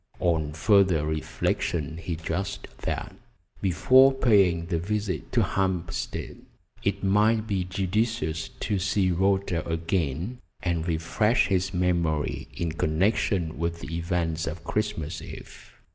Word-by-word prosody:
On 80 Hz, -4 st, +1 dB
further 95 Hz, -2 st, +4 dB
reflection 80 Hz, 0 st, -1 dB
he 85 Hz, 0 st, -4 dB
judged 90 Hz, +5 st, -4 dB
that, -, -, -4 dB, 0.5 s
before 130 Hz, +9 st, +6 dB
paying 100 Hz, -10 st, +3 dB
the 85 Hz, -1 st, -1 dB
visit 100 Hz, +2 st, -2 dB
to -, -, +3 dB
Hampstead, 90 Hz, -3 st, -2 dB, 0.5 s
it 100 Hz, 0 st, -1 dB
might 105 Hz, +3 st, +3 dB
be 100 Hz, -4 st, -1 dB
judicious 95 Hz, -2 st, -1 dB
to 100 Hz, -, 0 dB
see 95 Hz, 0 st, +1 dB
Rhoda 95 Hz, -1 st, +1 dB
again, 85 Hz, -, -1 dB, 0.2 s
and 85 Hz, -2 st, -1 dB
refresh 90 Hz, +9 st, +2 dB
his 95 Hz, 0 st, +1 dB
memory 85 Hz, -5 st, 0 dB
in 85 Hz, -2 st, -2 dB
connection 85 Hz, +1 st, 0 dB
with 85 Hz, 0 st, -2 dB
the 85 Hz, -, -5 dB
events 85 Hz, -2 st, -1 dB
of 80 Hz, +4 st, -5 dB
Christmas 95 Hz, -7 st, -2 dB
Eve. -, -, -11 dB
90 Hz, 120 wpm, -26 LUFS, 80-100 Hz, 0.5 s, before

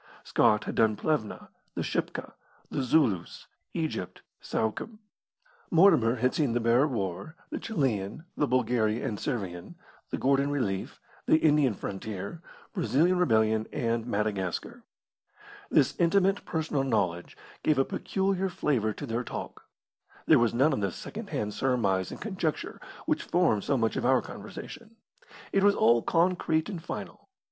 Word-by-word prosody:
Scott 105 Hz, 0 st, +3 dB
had -, -, -4 dB
done 110 Hz, -1 st, +3 dB
Plevna, 150 Hz, -4 st, -2 dB, 0.3 s
the -, -, -1 dB
Shipka, -, -, -3 dB, 0.4 s
the -, -, -1 dB
Zulus, 125 Hz, -, +1 dB, 0.3 s
Egypt, 155 Hz, -, -3 dB, 0.2 s
Suakim; 110 Hz, -, -2 dB, 0.7 s
Mortimer 160 Hz, -, +5 dB
had 125 Hz, +1 st, +1 dB
seen 145 Hz, -7 st, +1 dB
the 120 Hz, -, +1 dB
Boer 120 Hz, +5 st, +4 dB
War, 110 Hz, -, -4 dB, 0.2 s
the -, -, -3 dB
Chilian, 135 Hz, -, -2 dB
the 145 Hz, -, +1 dB
Bulgaria 120 Hz, -3 st, +1 dB
and 105 Hz, -, -3 dB
Servian, 95 Hz, -10 st, -4 dB, 0.3 s
the -, -, -2 dB
Gordon 140 Hz, +1 st, +2 dB
relief, 115 Hz, -10 st, -2 dB, 0.3 s
the -, -, +6 dB
Indian 150 Hz, -7 st, +3 dB
frontier, 100 Hz, -, -6 dB, 0.3 s
Brazilian 175 Hz, -, +2 dB
rebellion, 110 Hz, -7 st, +2 dB
and 115 Hz, 0 st, -1 dB
Madagascar. 100 Hz, -5 st, -2 dB, 0.9 s
This -, -, +3 dB
intimate 195 Hz, +3 st, +3 dB
personal 155 Hz, -4 st, -1 dB
knowledge 95 Hz, -9 st, -1 dB, 0.2 s
gave 155 Hz, -3 st, +2 dB
a 135 Hz, -, +3 dB
peculiar 195 Hz, 0 st, -1 dB
flavour 125 Hz, -, 0 dB
to 145 Hz, -, -6 dB
their 120 Hz, -1 st, -2 dB
talk. -, -, -7 dB, 0.6 s
There 155 Hz, -, +6 dB
was 120 Hz, -1 st, +3 dB
none 135 Hz, +6 st, +3 dB
of 105 Hz, -, -1 dB
the 100 Hz, -2 st, 0 dB
second -, -, -8 dB
hand 105 Hz, 0 st, -2 dB
surmise 105 Hz, -6 st, +1 dB
and -, -, -8 dB
conjecture 185 Hz, -7 st, -3 dB, 0.2 s
which -, -, +1 dB
form 170 Hz, -, +2 dB
so 140 Hz, -, 0 dB
much 115 Hz, -2 st, 0 dB
of -, -, -1 dB
our 130 Hz, -1 st, +4 dB
conversation; 230 Hz, -3 st, -9 dB, 0.6 s
it 195 Hz, -, +2 dB
was 205 Hz, 0 st, +5 dB
all 115 Hz, 0 st, +4 dB
concrete 165 Hz, -, +1 dB
and 180 Hz, -6 st, -5 dB
final. -, -, -7 dB
130 Hz, 145 wpm, -28 LUFS, 110-160 Hz, 0.9 s, the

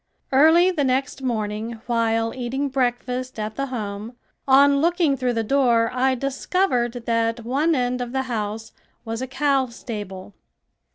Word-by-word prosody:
Early 320 Hz, +7 st, +6 dB
the 310 Hz, -6 st, 0 dB
next 265 Hz, +1 st, -1 dB
morning 225 Hz, -2 st, -3 dB
while 230 Hz, -1 st, 0 dB
eating 260 Hz, +3 st, -2 dB
breakfast 255 Hz, -1 st, -2 dB
at 215 Hz, 0 st, -4 dB
the 275 Hz, 0 st, -2 dB
home, 215 Hz, -2 st, -5 dB, 0.3 s
on 280 Hz, +1 st, +5 dB
looking 335 Hz, -3 st, +2 dB
through 250 Hz, -2 st, -1 dB
the 225 Hz, -1 st, 0 dB
door 235 Hz, -2 st, +2 dB
I 260 Hz, +1 st, +2 dB
discovered 270 Hz, -1 st, 0 dB
that 230 Hz, 0 st, 0 dB
one 295 Hz, +7 st, +1 dB
end 250 Hz, -1 st, -1 dB
of 245 Hz, -1 st, -4 dB
the 265 Hz, 0 st, -1 dB
house 220 Hz, -2 st, -4 dB, 0.3 s
was 225 Hz, +1 st, -4 dB
a 260 Hz, -, -3 dB
cow 270 Hz, 0 st, +1 dB
stable. 205 Hz, -5 st, -8 dB
250 Hz, 150 wpm, -23 LUFS, 230-275 Hz, 0.3 s, Early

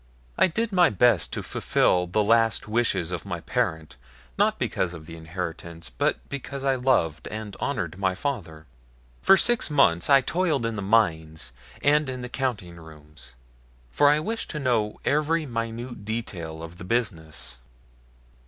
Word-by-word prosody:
I -, -, +5 dB
did 225 Hz, +6 st, -2 dB
my 180 Hz, -3 st, +5 dB
best 110 Hz, -2 st, +3 dB
to -, -, -3 dB
fulfil 90 Hz, 0 st, +1 dB
the 105 Hz, +4 st, +1 dB
last 115 Hz, 0 st, +2 dB
wishes 105 Hz, -6 st, 0 dB
of 90 Hz, -, -4 dB
my 90 Hz, -4 st, -4 dB
parent 80 Hz, -, -2 dB, 0.4 s
not -, -, +2 dB
because 90 Hz, -1 st, -1 dB
of 80 Hz, -2 st, -11 dB
the 80 Hz, -, -9 dB
inheritance, 85 Hz, -2 st, -7 dB
but -, -, -1 dB
because 140 Hz, 0 st, -6 dB
I 135 Hz, -1 st, +3 dB
loved 125 Hz, -, +1 dB
and 110 Hz, -2 st, -6 dB
honored 95 Hz, -, -3 dB
my 95 Hz, -2 st, +1 dB
father. 90 Hz, -, -4 dB, 0.6 s
For 195 Hz, -, +6 dB
six 240 Hz, -6 st, +2 dB
months 105 Hz, -, +3 dB
I 140 Hz, -1 st, +7 dB
toiled 160 Hz, -5 st, 0 dB
in 115 Hz, -1 st, -2 dB
the 100 Hz, -, -3 dB
mines 80 Hz, -, +1 dB, 0.3 s
and 150 Hz, -1 st, +3 dB
in 130 Hz, -1 st, -5 dB
the 125 Hz, -, -5 dB
counting 110 Hz, -10 st, -3 dB
rooms, 75 Hz, -4 st, -13 dB, 0.6 s
for 145 Hz, 0 st, +5 dB
I 150 Hz, +1 st, +4 dB
wished 225 Hz, +9 st, -3 dB
to 150 Hz, -, -4 dB
know 115 Hz, -6 st, 0 dB
every 155 Hz, +2 st, +1 dB
minute 115 Hz, -1 st, -5 dB
detail 90 Hz, -8 st, -5 dB
of 85 Hz, +2 st, -10 dB
the -, -, -7 dB
business. 80 Hz, -, -2 dB
110 Hz, 160 wpm, -25 LUFS, 85-135 Hz, 0.6 s, I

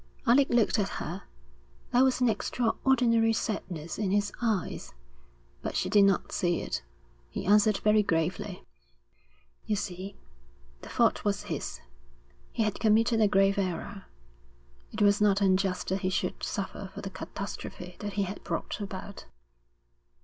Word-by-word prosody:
Alec 265 Hz, +3 st, +5 dB
looked 235 Hz, -2 st, +3 dB
at 195 Hz, -, +1 dB
her. -, -, -5 dB, 0.7 s
There 245 Hz, +2 st, +6 dB
was 260 Hz, -1 st, +2 dB
an 250 Hz, -, +5 dB
extraordinary 230 Hz, +1 st, +2 dB
sadness 185 Hz, -7 st, -3 dB
in 205 Hz, -3 st, 0 dB
his 205 Hz, +1 st, +1 dB
eyes, 215 Hz, -, -2 dB, 0.7 s
but -, -, -4 dB
she -, -, 0 dB
did 205 Hz, -2 st, +6 dB
not 195 Hz, -1 st, +1 dB
see 175 Hz, -2 st, +1 dB
it. -, -, -3 dB, 0.5 s
He -, -, -5 dB
answered 210 Hz, +1 st, +5 dB
very 215 Hz, 0 st, +5 dB
gravely. 165 Hz, -2 st, -1 dB, 1.0 s
'You 215 Hz, -, +1 dB
see, 190 Hz, 0 st, -5 dB, 0.6 s
the -, -, -10 dB
fault -, -, +2 dB
was -, -, 0 dB
his. -, -, -5 dB, 0.7 s
He 225 Hz, -, 0 dB
had 215 Hz, -2 st, -1 dB
committed 225 Hz, +1 st, +3 dB
a 215 Hz, -, +6 dB
grave 195 Hz, 0 st, +3 dB
error. 195 Hz, +1 st, -3 dB, 0.9 s
It 215 Hz, -1 st, 0 dB
was 205 Hz, 0 st, +4 dB
not 200 Hz, -1 st, +4 dB
unjust 190 Hz, -1 st, +1 dB
that 190 Hz, +1 st, 0 dB
he 185 Hz, -, 0 dB
should 185 Hz, -1 st, -2 dB
suffer 195 Hz, 0 st, -4 dB
for -, -, -6 dB
the 195 Hz, -, -6 dB
catastrophe 180 Hz, -2 st, -7 dB
that 205 Hz, -1 st, -4 dB
he 200 Hz, 0 st, +1 dB
had 195 Hz, +1 st, -6 dB
brought -, -, -3 dB
about.' 195 Hz, 0 st, -7 dB
205 Hz, 150 wpm, -29 LUFS, 190-220 Hz, 1.0 s, There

